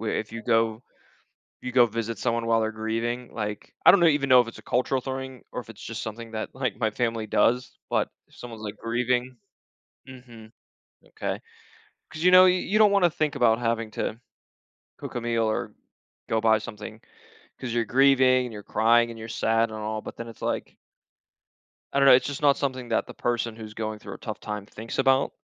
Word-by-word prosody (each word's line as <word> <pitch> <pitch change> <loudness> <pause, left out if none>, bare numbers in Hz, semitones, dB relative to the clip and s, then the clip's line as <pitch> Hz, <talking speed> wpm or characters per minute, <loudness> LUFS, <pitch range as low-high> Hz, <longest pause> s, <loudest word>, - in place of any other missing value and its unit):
we 110 -1 -1
if 110 - -6
you 115 0 -6
go 115 -1 +1 0.8
you 125 - -5
go 125 -1 +5
visit 115 0 -4
someone 115 0 -1
while 115 0 +2
they're 110 0 -1
grieving, 115 +3 -3
like 105 -1 -5
I - - +10
don't 200 - +5
know. 170 - +4
Even 145 -3 +2
know 125 -1 +8
if 120 - -6
it's 115 - -9
a - - -12
cultural 130 +1 0
thing 130 -1 -6
or - - -4
if 115 - -18
it's 105 - -16
just 115 0 -6
something 115 +1 -7
that, 110 0 -4
like, 125 -5 -3
my 110 -2 +1
family 115 0 -1
does, 125 +4 +1
but - - +1 0.2
if - - -23
someone's, 115 -3 -9
like, 105 0 -6
grieving 125 +2 -1 0.7
Mhm. 120 -4 -13 0.6
Okay. - - -4 0.7
'Cause, 155 - -7
you 180 - +6
know, 185 0 +9
you 180 0 +3
you 210 - 0
don't 215 -1 +6
wanna 195 -3 +4
think 155 -3 -1
about 115 -4 +3
having 115 -2 -1
to 110 +2 -3 0.8
cook - - -8
a 120 - -2
meal 115 -1 0
or 110 - -2 0.6
go 110 0 +1
buy 110 -1 +4
something, 110 0 -9 0.6
'cause 130 - -5
you're 120 -1 +1
grieving 130 0 +4
and 115 - -10
you're 105 -1 -8
crying 115 +3 +3
and 115 - -10
you're 110 - -7
sad 115 0 +1
and 110 - -7
all, 110 0 -3
but - - -9
then 115 - -6
it's 115 - -12
like - - -3 1.2
I 140 - +2
don't 140 - +5
know, - - +9
it's 130 - +1
just 145 0 -5
not 140 -2 +4
something 130 -3 -3
that 115 - 0
the - - -9
person 120 -2 -2
who's 110 -1 -9
going 110 -1 -4
through - - -9
a - - -13
tough 110 -3 -6
time 105 -1 -5
thinks 110 +4 -7
about, 135 0 +3
115 Hz, 210 wpm, -26 LUFS, 110-130 Hz, 1.2 s, I